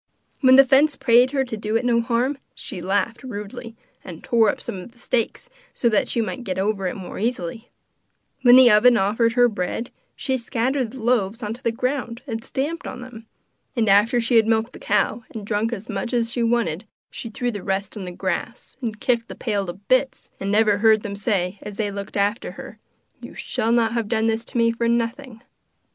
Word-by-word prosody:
When 260 -2 +6
the 270 +1 +8
fence 275 +3 +4
prayed 250 -1 +4
her 270 -1 0
to 240 - -5
do 215 +1 -3
it 230 +2 +1
no 235 -1 +3
harm, 245 +4 0 0.2
she 180 - -7
laughed 200 +5 -1
rudely, 230 -1 -7 0.3
and 170 -3 -10
tore 225 -3 +3
up - - -2
some 190 - -6
of 230 +6 -11
the - - -26
stakes 240 - -2 0.3
so 235 - +2
that 215 - +2
she 235 - 0
might 245 +3 -4
get 185 -4 -3
over 195 -1 0
the - - -6
more 190 - -7
easily; 225 0 -3 0.7
when 245 -1 +8
the 255 -2 +8
oven 235 +3 +6
offered 225 +3 +2
her 245 0 +5
bread, 215 +2 -3 0.2
she 265 -2 -1
scattered 250 +1 -1
the 260 - -10
loaves 225 -1 +1
onto 220 +4 -5
the 230 - 0
ground 250 0 -3
and 225 -4 -5
stamped 310 +6 -3
on 250 - -7
them; 235 -3 -11 0.5
and 230 -3 +1
after 210 +5 +4
she 230 +1 +2
had 220 -1 +4
milked 225 +2 +1
the - - -11
cow, 240 - 0
and 215 -2 -6
drunk 215 +2 -1
as 225 -1 -6
much 225 +3 -4
as 230 -1 0
she 240 - -2
wanted, 230 -5 0 0.3
she 230 - -6
threw 245 +2 -2
the 205 -3 -6
rest 195 +2 -3
on 205 - -6
the 180 - -6
grass, 190 +8 -4
and 220 -4 -4
kicked 235 -1 +1
the - - -8
pail 205 -5 -2
to 175 - -4
bits, 255 +8 -1
and 195 +1 -2
never 210 -1 +3
heard 220 -1 +4
them 200 -3 -5
say, 200 -2 -1
as 210 - -8
they 205 -1 -2
looked 200 0 -6
after 205 +3 0
her: - - -10 0.4
'You - - -10
shall 225 - -1
not 235 -1 +2
have 230 -3 -1
done 220 0 0
this 225 0 0
to 250 - -6
me 230 0 +4
for 230 0 -1
nothing! 235 +1 -2
230 Hz, 215 wpm, -22 LUFS, 210-245 Hz, 0.7 s, the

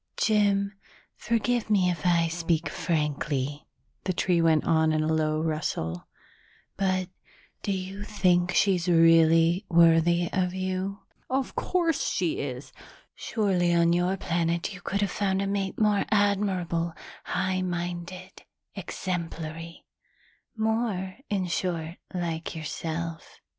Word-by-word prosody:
"Jim, 200 -2 +2 0.4
forgive 235 0 0
me 195 -4 +3
if 170 0 -2
I 170 -1 +3
speak 165 -1 -1
frankly," 150 -3 -2 0.4
the 185 - 0
tree 175 -1 +2
went 160 -2 +3
on 160 -1 +3
in 155 0 +1
a 160 +1 +1
low 155 -1 +1
rustle, 155 - -2 0.7
"but 185 -1 0 0.5
do 200 - -2
you 190 +1 -4
think 180 -4 +2
she's 185 -3 +2
really 165 +1 +5
worthy 170 0 +4
of 185 -1 0
you?" 190 +1 -3 0.3
"Of 265 +1 -1
course 340 -4 0
she 175 -3 -1
is!" 130 -1 -5 0.4
"Surely 180 -6 0
on 170 0 +4
your 180 +2 +1
planet 170 +1 -1
you 180 - -10
could 200 +3 -2
have 200 -2 0
found 190 -2 0
a 200 - 0
mate 195 -1 -2
more 210 -2 +3
admirable, 190 -5 +1 0.3
high 185 0 -1
minded, 180 +1 -5 0.3
exemplary 165 -2 -5 0.7
more, 220 -4 -1
in 195 -3 0
short, 170 -1 -2
like 170 -3 -3
yourself. 165 +1 -5
175 Hz, 120 wpm, -27 LUFS, 165-195 Hz, 0.7 s, really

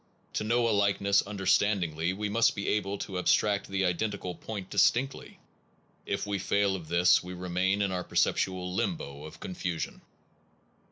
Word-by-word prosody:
To - - -1
know 115 +2 +2
a - - +2
likeness 100 0 +3
understandingly 95 -4 +1
we 105 +3 -3
must 115 +3 +3
be 100 - -4
able 100 -1 0
to 95 -2 -4
abstract 100 +2 +2
the 95 0 0
identical 90 0 -2
point 100 0 -7
distinctly. 135 +3 +1 0.7
If - - -1
we 100 -1 -2
fail 100 +1 +1
of 85 -4 -7
this, 85 +2 +4
we 90 +1 -8
remain 90 +3 0
in 100 - 0
our 90 -1 -2
perceptual 90 0 0
limbo 80 -9 -3
of 80 - -11
confusion. 90 -2 -4
95 Hz, 155 wpm, -29 LUFS, 90-100 Hz, 0.7 s, this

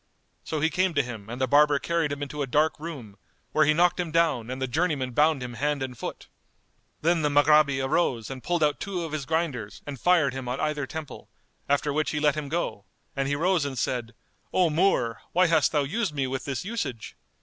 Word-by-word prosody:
So 155 -2 -3
he 160 +1 +2
came 185 -2 +1
to 145 - +3
him 110 -4 -8
and 120 +2 -6
the 130 - +2
barber 145 +2 +5
carried 165 +1 -1
him 145 0 -3
into 145 +1 -5
a 140 - -1
dark 150 +5 +1
room, 130 -11 -8 0.3
where 155 - +4
he 155 - +4
knocked 175 +2 +3
him 175 -2 -1
down 155 -8 +1
and 130 +1 -4
the 130 - -1
journeymen 140 -2 0
bound 150 +1 +2
him 125 -1 -6
hand 140 +3 -1
and 130 -1 -5
foot. - - -7 0.8
Then 170 0 +3
the 150 - +2
Maghrabi 145 -1 +4
arose 135 -6 0
and 130 -1 -7
pulled 175 -2 0
out 150 -1 +1
two 185 -3 -3
of 165 - -5
his 150 -3 -4
grinders 140 -11 -2
and 140 -3 -6
fired 175 -4 +3
him 130 -1 -6
on 125 +2 -2
either 150 -3 -1
temple; 160 0 -8 0.4
after 145 +1 +1
which 155 +1 0
he 150 - -1
let 150 -1 +3
him 150 -2 -5
go, 115 -11 -3 0.3
and 135 0 -1
he 145 - 0
rose 175 +1 +2
and 140 -2 -4
said, 120 -1 -2 0.4
"O 180 -3 +3
Moor, 150 - +1
why 185 +2 +5
hast 160 -3 +3
thou 150 -2 +2
used 165 +3 -2
me 135 -2 0
with 130 0 -4
this 135 +2 -3
usage?" 195 - -4
145 Hz, 225 wpm, -26 LUFS, 130-160 Hz, 0.8 s, barber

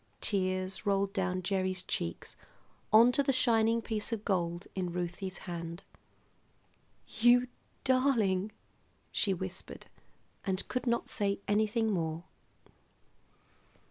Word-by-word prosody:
Tears 185 -2 0
rolled 200 -1 +1
down 185 -1 -1
Gerry's 185 -1 -1
cheeks 85 0 -4 0.6
onto 235 +5 +6
the 275 - +2
shining 230 -3 +3
piece 215 0 -2
of 220 -2 -3
gold 175 -2 -1
in 180 -2 -2
Ruthie's 180 +2 -4
hand. 170 0 -6 1.4
"You 245 +2 +6 0.4
darling!" 230 -7 +2 0.6
she 200 - +1
whispered, 185 0 -5 0.6
and 190 -2 -2
could 250 0 -3
not 235 0 +1
say 200 -2 0
anything 215 +2 +2
more. 165 -3 -2
195 Hz, 105 wpm, -31 LUFS, 185-225 Hz, 1.4 s, onto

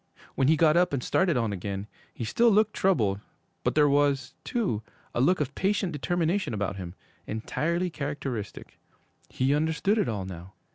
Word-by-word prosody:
When 135 - +1
he 155 +1 +4
got 155 0 +4
up 175 -3 +3
and 130 -3 -1
started 180 -7 +2
on 115 -4 0
again, 100 +1 -4 0.3
he - - -6
still 230 - +3
looked 215 0 +3
troubled, 110 - +2 0.4
but - - 0
there 150 -1 +5
was, 140 -2 +2
too, 195 - -1 0.3
a 120 - 0
look 180 +8 +3
of 145 -2 -2
patient 195 -1 0
determination 170 - 0
about 100 -1 -2
him 90 -1 -7 0.3
entirely 170 +11 -1
characteristic. 140 -8 -5 0.5
He 130 +2 +1
understood 160 +8 +1
it 200 - +1
all 100 -4 -3
now. 90 0 -9
145 Hz, 170 wpm, -27 LUFS, 110-175 Hz, 0.5 s, there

